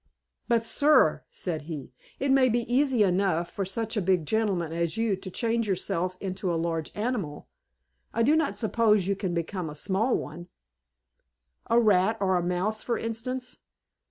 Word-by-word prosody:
"But, 230 Hz, -2 st, +2 dB
sir," 295 Hz, +5 st, +4 dB
said 165 Hz, -4 st, -3 dB
he, 150 Hz, -5 st, -6 dB, 0.3 s
"it 275 Hz, 0 st, +1 dB
may 265 Hz, -1 st, +5 dB
be 240 Hz, +1 st, +1 dB
easy 250 Hz, -1 st, +2 dB
enough 180 Hz, -3 st, +1 dB
for 195 Hz, -, -3 dB
such 220 Hz, +4 st, -3 dB
a 210 Hz, -, +1 dB
big 180 Hz, -3 st, +1 dB
gentleman 190 Hz, -5 st, 0 dB
as 170 Hz, +3 st, -1 dB
you 225 Hz, -3 st, +1 dB
to 190 Hz, 0 st, -8 dB
change 230 Hz, +3 st, 0 dB
himself 185 Hz, -1 st, -1 dB
into 185 Hz, -1 st, -3 dB
a -, -, 0 dB
large 165 Hz, -1 st, -2 dB
animal: 205 Hz, -10 st, -3 dB, 0.6 s
I 230 Hz, -, +1 dB
do 290 Hz, +6 st, +4 dB
not 285 Hz, -11 st, 0 dB
suppose 215 Hz, -3 st, +2 dB
you 200 Hz, +1 st, 0 dB
can 185 Hz, -3 st, -3 dB
become 170 Hz, 0 st, -3 dB
a 150 Hz, -, -8 dB
small 195 Hz, -, +1 dB
one 175 Hz, +4 st, -7 dB, 1.2 s
a 230 Hz, -, +5 dB
rat 215 Hz, -1 st, +3 dB
or 190 Hz, -2 st, +2 dB
mouse 180 Hz, +5 st, -1 dB
for 235 Hz, -, -1 dB
instance. 250 Hz, +3 st, -4 dB
200 Hz, 165 wpm, -27 LUFS, 180-230 Hz, 1.2 s, may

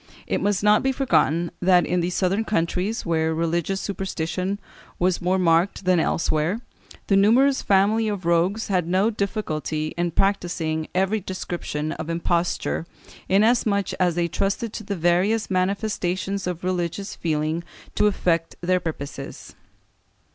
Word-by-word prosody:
It -, -, -1 dB
must 205 Hz, -1 st, 0 dB
not 210 Hz, 0 st, +5 dB
be 265 Hz, -, +1 dB
forgotten 175 Hz, -, +1 dB
that 180 Hz, -2 st, +4 dB
in 180 Hz, -, 0 dB
the 175 Hz, +1 st, 0 dB
southern 190 Hz, +4 st, 0 dB
countries, 195 Hz, +2 st, -1 dB
where 160 Hz, -1 st, +1 dB
religions 170 Hz, +3 st, -1 dB
superstition 190 Hz, 0 st, -3 dB, 0.4 s
was 180 Hz, 0 st, +1 dB
more 180 Hz, +2 st, +1 dB
marked 180 Hz, +2 st, +2 dB
than 180 Hz, -1 st, +4 dB
elsewhere, 160 Hz, +5 st, 0 dB, 0.5 s
the 200 Hz, -, +2 dB
numerous 250 Hz, +8 st, +4 dB
family 205 Hz, +3 st, +3 dB
of 200 Hz, -4 st, -3 dB
rogues 175 Hz, +6 st, +1 dB
had 180 Hz, -5 st, 0 dB
no 190 Hz, +5 st, +2 dB
difficulty 155 Hz, -7 st, -2 dB
in 175 Hz, 0 st, +1 dB
practising 170 Hz, -4 st, 0 dB
every 195 Hz, +4 st, +2 dB
description 175 Hz, -5 st, -4 dB
of 160 Hz, -, -5 dB
imposture, 170 Hz, 0 st, -1 dB, 0.4 s
inasmuch 205 Hz, 0 st, +2 dB
as 180 Hz, -2 st, +2 dB
they 170 Hz, -1 st, +1 dB
trusted 200 Hz, +6 st, -2 dB
to 215 Hz, -, -6 dB
the 200 Hz, 0 st, -3 dB
various 185 Hz, +6 st, +1 dB
manifestations 190 Hz, 0 st, -1 dB
of 180 Hz, -1 st, -4 dB
religions 185 Hz, +2 st, -2 dB
feeling 155 Hz, +1 st, -1 dB, 0.3 s
to 210 Hz, -, +3 dB
effect 170 Hz, -5 st, 0 dB
their 180 Hz, +1 st, +2 dB
purposes. 145 Hz, -5 st, -7 dB
185 Hz, 140 wpm, -23 LUFS, 170-200 Hz, 0.5 s, not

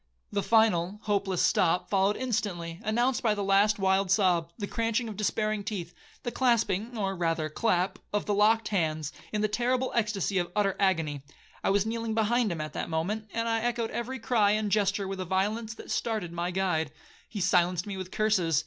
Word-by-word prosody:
The 200 Hz, -, 0 dB
final—hopeless 200 Hz, -2 st, +2 dB
stop 180 Hz, 0 st, +2 dB
followed 195 Hz, +1 st, +2 dB
instantly, 180 Hz, -9 st, -2 dB
announced 240 Hz, +4 st, +1 dB
by 220 Hz, -3 st, +2 dB
the 205 Hz, -, -2 dB
last 200 Hz, +2 st, +4 dB
wild 190 Hz, 0 st, +2 dB
sob, 180 Hz, -4 st, +2 dB
the 205 Hz, -, -3 dB
cranching 230 Hz, +2 st, -1 dB
of 215 Hz, -, -6 dB
despairing 215 Hz, +1 st, -1 dB
teeth, 185 Hz, -5 st, -5 dB, 0.3 s
the 240 Hz, -, -2 dB
clasping, 235 Hz, -2 st, +1 dB
or 195 Hz, -2 st, -1 dB
rather 165 Hz, -3 st, -1 dB
clap, 185 Hz, +2 st, 0 dB
of 210 Hz, -, -1 dB
the 210 Hz, -, 0 dB
locked 215 Hz, +2 st, +3 dB
hands, 155 Hz, -6 st, -1 dB, 0.2 s
in 210 Hz, -, -1 dB
the 215 Hz, -, +3 dB
terrible 250 Hz, +4 st, 0 dB
extacy 205 Hz, -4 st, 0 dB
of 175 Hz, 0 st, -6 dB
utter 200 Hz, -2 st, +2 dB
agony. 160 Hz, -7 st, +1 dB, 0.4 s
I -, -, +2 dB
was 200 Hz, +1 st, +2 dB
kneeling 225 Hz, 0 st, -2 dB
behind 225 Hz, 0 st, +2 dB
him 165 Hz, -2 st, -3 dB
at 155 Hz, -, -5 dB
that -, -, -4 dB
moment, 205 Hz, +7 st, -2 dB
and 230 Hz, 0 st, -1 dB
I 225 Hz, 0 st, +1 dB
echoed 235 Hz, -1 st, -1 dB
every 255 Hz, +3 st, -3 dB
cry 225 Hz, -4 st, +2 dB
and 215 Hz, -1 st, -1 dB
gesture 200 Hz, -1 st, +1 dB
with 195 Hz, 0 st, -5 dB
a -, -, -1 dB
violence 210 Hz, +5 st, -1 dB
that -, -, -9 dB
started 215 Hz, -7 st, -2 dB
my 170 Hz, +1 st, -2 dB
guide. 175 Hz, -5 st, 0 dB, 0.4 s
He 210 Hz, -, -5 dB
silenced 180 Hz, -1 st, +2 dB
me 200 Hz, -2 st, -5 dB
with 185 Hz, -1 st, -6 dB
curses. 185 Hz, -8 st, +2 dB
205 Hz, 190 wpm, -28 LUFS, 180-220 Hz, 0.4 s, last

